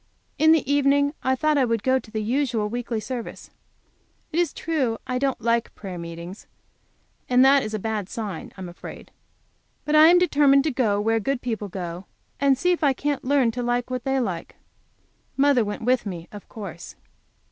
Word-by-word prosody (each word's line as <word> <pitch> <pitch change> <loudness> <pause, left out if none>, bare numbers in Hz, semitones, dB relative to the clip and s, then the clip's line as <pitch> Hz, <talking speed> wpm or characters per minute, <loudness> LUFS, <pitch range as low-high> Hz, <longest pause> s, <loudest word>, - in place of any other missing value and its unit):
In 315 +1 +6
the 320 -4 +3
evening 285 0 +3
I 260 0 +1
thought 305 +1 +2
I - - +4
would 230 -3 -1
go 260 0 +3
to 220 - -15
the 215 -1 -3
usual 240 -2 0
weekly 235 0 -3
service. 240 +1 -7 0.8
It 325 - 0
is 350 - +1
true 275 -9 -1
I 255 -1 -2
don't 270 -1 0
like 230 +1 0
prayer 185 -4 -7
meetings, 170 +3 -8 0.8
and 250 +1 +5
that 275 +1 +6
is 215 -2 -4
a - - 0
bad 210 -2 -3
sign, 210 -8 -6
I - - -9
am 185 - -5
afraid. 175 - -10 0.7
But 300 +1 +1
I 310 +1 +8
am 350 +2 +7
determined 285 -6 +4
to 310 - 0
go 225 -6 +1
where 225 +2 +1
good 260 +4 -2
people 220 -4 -3
go, 175 0 -6 0.3
and 275 -1 +3
see 360 +7 +2
if 345 -2 -1
I 280 -2 +4
can't 290 +1 -2
learn 265 -3 +2
to 245 +2 -4
like 245 +1 -1
what 250 -1 -3
they 270 0 0
like. 185 -9 -4 0.8
Mother 275 -3 +4
went 205 +2 -5
with 250 -1 +1
me, 175 -3 -6
of 205 -1 -11
course. 190 -7 -9
245 Hz, 195 wpm, -24 LUFS, 215-280 Hz, 0.8 s, I